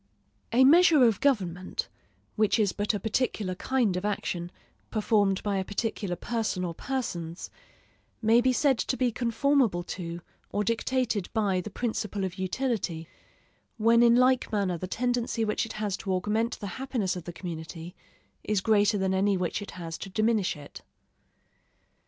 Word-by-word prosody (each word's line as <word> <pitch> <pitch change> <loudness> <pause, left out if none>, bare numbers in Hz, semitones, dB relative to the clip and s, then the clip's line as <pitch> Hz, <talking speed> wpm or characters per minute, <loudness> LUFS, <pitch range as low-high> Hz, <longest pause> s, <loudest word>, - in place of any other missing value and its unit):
A 245 +3 +5
measure 315 0 +7
of 225 -4 +4
government 185 -10 0 0.5
(which 215 0 +3
is 210 -4 +2
but 210 +1 0
a - - -2
particular 215 -2 -1
kind 230 0 0
of 180 - -3
action, 180 -4 -2 0.4
performed 205 -3 +1
by 205 -2 0
a 190 - 0
particular 205 -2 -3
person 220 -2 -2
or 170 - -3
persons) 175 -8 -4 0.7
may 225 +2 +4
be 260 +1 +3
said 265 -1 +2
to 255 - -1
be 250 -2 +1
conformable 235 -4 +1
to 170 -1 -6 0.3
or 205 - -1
dictated 230 -2 0
by 200 -5 +1
the 195 - -7
principle 210 -3 -3
of 185 0 -4
utility, 185 -5 -2 0.7
when 230 +1 +4
in 235 0 +6
like 255 +1 +3
manner 200 -4 0
the 185 +2 -5
tendency 240 +1 -1
which 210 +1 -1
it - - -7
has 210 -3 -2
to 195 - -4
augment 215 +6 -1
the 205 - -6 0.2
happiness 240 -9 -1
of 175 -3 -7
the 175 - -5
community 170 0 -7 0.5
is 210 -2 +1
greater 210 0 +3
than 190 -1 0
any 195 +1 +2
which 180 +2 -2
it 205 - -7
has 165 -2 -6
to - - -7
diminish 215 -3 +1
it. 145 -1 -11
210 Hz, 160 wpm, -28 LUFS, 185-235 Hz, 0.7 s, measure